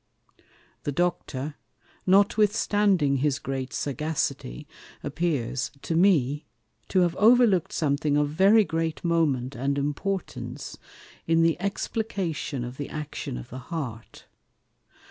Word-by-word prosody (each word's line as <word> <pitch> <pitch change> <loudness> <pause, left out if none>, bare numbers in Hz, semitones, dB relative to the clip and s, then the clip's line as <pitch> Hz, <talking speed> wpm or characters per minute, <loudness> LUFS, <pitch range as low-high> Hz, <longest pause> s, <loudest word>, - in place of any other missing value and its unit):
The 145 - -2
Doctor, 150 -3 -2 0.5
notwithstanding 200 -5 +3
his 140 +1 +1
great 135 -2 -4
Sagacity, 145 -1 -3 0.4
appears 140 -4 -1
(to 165 - -1
me) 150 -5 +3 0.4
to 185 - +2
have 175 -1 +2
overlook'd 220 -4 +5
something 145 -1 +1
of 145 0 +2
very 195 +8 +5
great 165 -3 -2
moment, 145 -7 +1
and 140 +3 -1
importance 155 +7 -3 0.5
in 165 0 +4
the 165 -1 +3
explication 195 - -2
of 125 +2 -7
the 145 - -5
Action 150 - -5
of - - -9
the 130 - -6
Heart. 125 -6 -6
155 Hz, 110 wpm, -26 LUFS, 140-185 Hz, 0.5 s, overlook'd